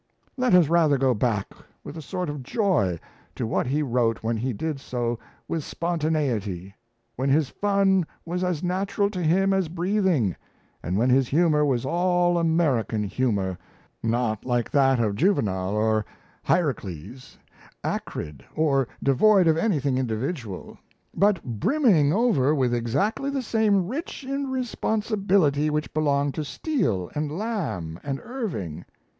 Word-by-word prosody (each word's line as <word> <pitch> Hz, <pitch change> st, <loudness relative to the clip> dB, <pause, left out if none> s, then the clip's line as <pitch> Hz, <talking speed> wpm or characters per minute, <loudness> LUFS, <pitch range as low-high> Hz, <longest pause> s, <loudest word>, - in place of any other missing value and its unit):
Let 250 Hz, -6 st, +3 dB
us 175 Hz, -4 st, +6 dB
rather 160 Hz, -3 st, +3 dB
go 130 Hz, -1 st, +3 dB
back 105 Hz, -3 st, -1 dB, 0.3 s
with -, -, -8 dB
a 160 Hz, -, -6 dB
sort 180 Hz, +3 st, -4 dB
of 145 Hz, -2 st, -4 dB
joy 140 Hz, -, +1 dB, 0.4 s
to 120 Hz, -, -2 dB
what 110 Hz, -, -1 dB
he 145 Hz, +4 st, +1 dB
wrote 120 Hz, -4 st, 0 dB
when 115 Hz, +1 st, 0 dB
he 125 Hz, +4 st, -2 dB
did 145 Hz, +6 st, -3 dB
so 120 Hz, -3 st, -3 dB, 0.3 s
with 160 Hz, -2 st, -2 dB
spontaneity, 140 Hz, -, -2 dB, 0.4 s
when 135 Hz, +2 st, 0 dB
his 145 Hz, 0 st, +3 dB
fun 195 Hz, -3 st, +2 dB, 0.2 s
was 180 Hz, +2 st, -2 dB
as 180 Hz, -3 st, -1 dB
natural 200 Hz, +3 st, 0 dB
to 185 Hz, -3 st, -4 dB
him 190 Hz, +4 st, +3 dB
as 190 Hz, -4 st, 0 dB
breathing, 175 Hz, -, +1 dB, 0.5 s
and 90 Hz, +4 st, -2 dB
when 125 Hz, +4 st, +3 dB
his 130 Hz, 0 st, +4 dB
humour 150 Hz, 0 st, +3 dB
was 130 Hz, -4 st, +1 dB
all 175 Hz, +2 st, +2 dB
American 150 Hz, -10 st, +1 dB
humour 100 Hz, -4 st, -1 dB, 0.4 s
not 115 Hz, -2 st, 0 dB
like 120 Hz, -2 st, -1 dB
that 135 Hz, -3 st, +4 dB
of 105 Hz, -3 st, +1 dB
Juvenal 100 Hz, -, +1 dB
or 110 Hz, 0 st, +2 dB, 0.4 s
Hierocles 125 Hz, -, -2 dB, 0.5 s
acrid, 75 Hz, -2 st, -4 dB
or 140 Hz, -5 st, +2 dB, 0.2 s
devoid 185 Hz, +8 st, +5 dB
of 160 Hz, -, +4 dB
anything 145 Hz, -, +1 dB
individual 115 Hz, -, -4 dB, 0.3 s
but 200 Hz, -3 st, +2 dB
brimming 155 Hz, -, +2 dB
over 155 Hz, -, +3 dB
with 130 Hz, -4 st, +1 dB
exactly 140 Hz, -, 0 dB
the 275 Hz, -2 st, -2 dB
same 210 Hz, -5 st, +2 dB
rich 310 Hz, -, -5 dB
irresponsibility 215 Hz, -, 0 dB
which 150 Hz, 0 st, -2 dB
belonged 145 Hz, -2 st, +1 dB
to 155 Hz, -, -3 dB
Steele 140 Hz, -, -1 dB
and 150 Hz, 0 st, -2 dB
Lamb 155 Hz, -, -3 dB
and 135 Hz, -1 st, -3 dB
Irving. 160 Hz, -, -5 dB
150 Hz, 140 wpm, -25 LUFS, 120-185 Hz, 0.5 s, us